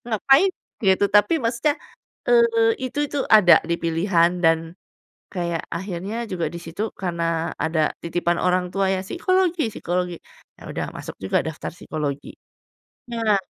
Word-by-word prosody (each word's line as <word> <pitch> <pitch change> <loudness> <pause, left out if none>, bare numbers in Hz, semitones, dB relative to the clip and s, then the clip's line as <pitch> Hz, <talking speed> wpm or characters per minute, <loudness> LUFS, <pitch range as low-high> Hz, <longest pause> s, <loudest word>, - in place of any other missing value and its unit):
ngapain 270 - +4 0.4
gitu, 190 +1 +4
tapi 210 +11 +5
maksudnya, 235 +5 0 0.5
eee, 230 -1 +4
itu 255 +3 -4
itu 290 - -3
ada 210 -5 +8
di 170 - +1
pilihan 170 +1 +2
dan 165 0 +2 0.6
kayak 170 -3 -2
akhirnya 185 +3 -4 0.2
juga 170 -3 -1
di - - -5
situ 185 +7 -4
karena 170 -2 -2
ada 160 -1 +1
titipan 170 0 -1
orang 180 0 +1
tua 195 -1 +1
ya, 185 - -1
psikologi 350 - +1
psikologi, 180 0 -2 0.4
ya - - -13
udah - - -3
aku - - -16
masuk - - -8
juga 95 - +1
daftar 160 -1 -5
psikologi. 150 -4 -5 0.8
Nah 225 -3 +2
185 Hz, 140 wpm, -23 LUFS, 170-230 Hz, 0.8 s, ada